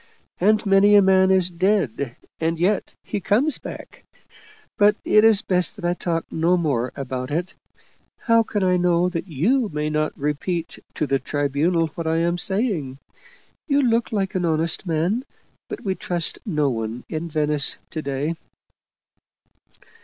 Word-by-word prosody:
" - - -42
And 215 +3 +3
many 200 +1 +5
a 205 - +8
man 190 0 +4
is 185 -1 +3
dead 170 - 0 0.2
and 165 +1 0
yet 195 +4 0
he - - -3
comes 240 - +1
back. - - -10 0.7
But 205 0 +4
it's 215 -1 +5
best 180 +1 +1
that 200 -5 -7
I 175 - +2
talk 170 -2 -2
no 170 +3 +2
more 135 -8 -1
about 130 -2 -4
it. 175 +5 -2 0.7
How 230 -1 +4
can 210 -3 -2
I 180 -1 +3
know 175 0 +2
that 180 +1 -5
you 210 - +1
may 150 0 -2
not 155 0 -1
repeat 150 +4 -3 0.2
to 155 - 0
the 135 -1 0
Tribunal 150 +5 0
what 165 +1 -6
I 160 0 +1
am 170 +1 0
saying? 190 - 0 0.7
You 285 -2 +2
look 235 -1 +1
like 195 -3 -1
an 185 - -1
honest 165 +2 0
man, 175 +9 0 0.5
but - - -6
we 190 - +1
trust 175 -3 -2
no 150 -7 +1
one 115 +1 -4
in 165 +1 -4
Venice 150 -2 +1
to 155 - -4
day." 140 +3 -2
170 Hz, 160 wpm, -22 LUFS, 150-195 Hz, 0.7 s, a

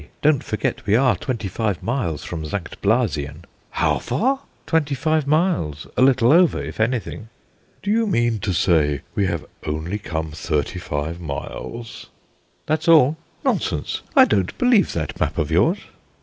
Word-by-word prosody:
Don't 150 -3 +3
forget 110 -1 -3
we 105 - +4
are 125 -2 +4
twenty 110 +2 -3
five 105 -1 -2
miles 110 - -2
from 80 -2 -5
St. 85 +3 -5
Blasien." 85 - 0 0.3
"How - - +1
far?" 265 +4 0 0.3
"Twenty 150 -4 +1
five 155 +1 0
miles, 150 - +1
a - - +1
little 130 -2 +5
over 175 0 +4
if - - -7
anything." 110 -1 -2 0.5
"Do 205 - 0
you 225 +1 +2
mean 120 - +1
to 95 +1 -2
say 80 -6 +2
we 100 -2 +1
have 85 -3 -3 0.2
only 80 +7 -3
come 80 -5 -4
thirty 75 +2 -2
five 80 0 -4
miles?" 110 +9 -6 0.6
"That's 155 +1 -1
all." 155 -3 +6 0.3
"Nonsense. - - -1
I 265 -2 +9
don't 95 - 0
believe 245 -5 +4
that 80 -2 -4
map - - -1
of - - -1
yours." - - +3
110 Hz, 155 wpm, -22 LUFS, -, 0.6 s, I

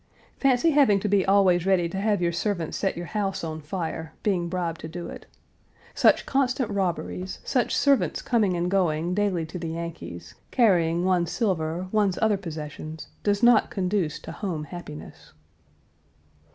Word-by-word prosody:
Fancy 275 +4 +3
having 275 -9 +4
to 210 - -1
be 200 -1 +3
always 190 -3 +4
ready 185 -3 +3
to 190 +3 -4
have 205 -3 +1
your 170 - +2
servants 170 -2 -2
set 195 - -1
your 175 - -4
house 195 -1 -2
on 160 -1 -4
fire, 160 0 -4
being 180 -5 0
bribed 170 -2 -3
to - - -6
do 170 +2 -6
it. - - -10 0.7
Such - - +4
constant 255 -4 0
robberies, 185 -1 -2
such 250 - 0
servants 280 -2 +2
coming 210 -7 +2
and 175 +1 -1
going 175 -3 +1
daily 195 -4 0
to 170 +3 -7
the 165 -1 -4
Yankees, 170 0 -7 0.2
carrying 175 -7 +3
one's 180 -3 +2
silver, 180 -5 -1
one's 205 -4 +2
other 220 -2 +3
possessions, 155 -3 -7
does 205 +1 0
not 240 -2 +6
conduce 185 -5 -1
to - - -8
home 175 -7 -4
happiness. 150 -1 -10
185 Hz, 160 wpm, -25 LUFS, 170-205 Hz, 0.7 s, not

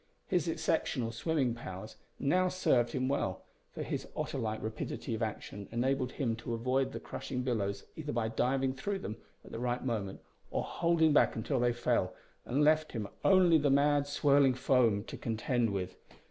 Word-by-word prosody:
His - - 0
exceptional 115 -2 0
swimming 130 0 0
powers 110 -3 -8 0.2
now 180 +6 +2
served 125 -10 +2
him 130 0 0
well, 95 -9 -1 0.3
for - - -5
his - - -4
otter - - -3
like 110 -1 -2
rapidity 110 +2 -4
of 110 - -3
action 105 -2 -4
enabled 130 +2 0
him 120 -6 -1
to 115 +1 -4
avoid 130 +3 0
the - - -5
crushing 125 -2 -5
billows 100 -6 -1
either 150 -2 -4
by 115 -3 0
diving 130 +3 +1
through 195 +10 -3
them 110 - -6 0.3
at - - -12
the - - -5
right 125 +1 -1
moment, 105 -6 -2 0.3
or - - -1
holding 165 -2 +2
back - - +4
until 125 +4 -1
they 120 0 +3
fell, 120 - 0 0.3
and 140 +4 +1
left 155 +1 +3
him 110 -4 -3
only 180 -4 +6
the 145 -1 +2
mad 145 +1 +3
swirling 140 -2 +4
foam 120 -5 +3
to - - -8
contend 115 +1 0
with. 95 -2 -3
125 Hz, 175 wpm, -32 LUFS, 115-145 Hz, 0.3 s, only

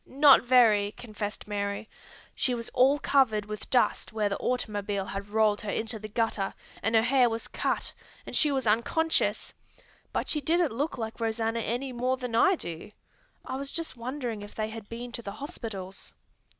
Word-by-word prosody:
"Not 280 0 +7
very," 220 -5 +4
confessed 215 -4 -6
Mary. 200 0 -3 0.5
"She 250 - 0
was 230 -1 -4
all 265 +3 +4
covered 240 -8 +2
with 210 0 -7
dust 250 - +2
where 215 -2 0
the 200 - -2
automobile 205 -5 -1
had 195 +1 -5
rolled 215 -1 +2
her 210 - -5
into 220 +2 -2
the 215 - -7
gutter, 215 -3 -1 0.3
and 225 +1 +1
her 220 - +5
head 255 +1 +4
was 225 -1 -3
cut, - - -2 0.3
and - - -6
she 300 - +5
was 265 -2 0
unconscious: 235 +9 +1 0.6
but - - -1
she 300 - +1
didn't 330 -1 +2
look 285 +7 -2
like 225 -1 -5
Rosanna 225 0 -1
any 245 +4 -2
more 255 +2 0
than 250 -2 -5
I 375 +12 +5
do. 170 - -6 0.6
I 260 - -4
was 275 0 -5
just 330 -4 -4
wondering 240 -2 -4
if 205 - -10
they 215 0 -2
had 220 -2 -9
been 240 +1 -6
to 235 - -6
the 200 -3 -6
hospitals." 205 -6 -7
230 Hz, 180 wpm, -28 LUFS, 210-255 Hz, 0.6 s, Not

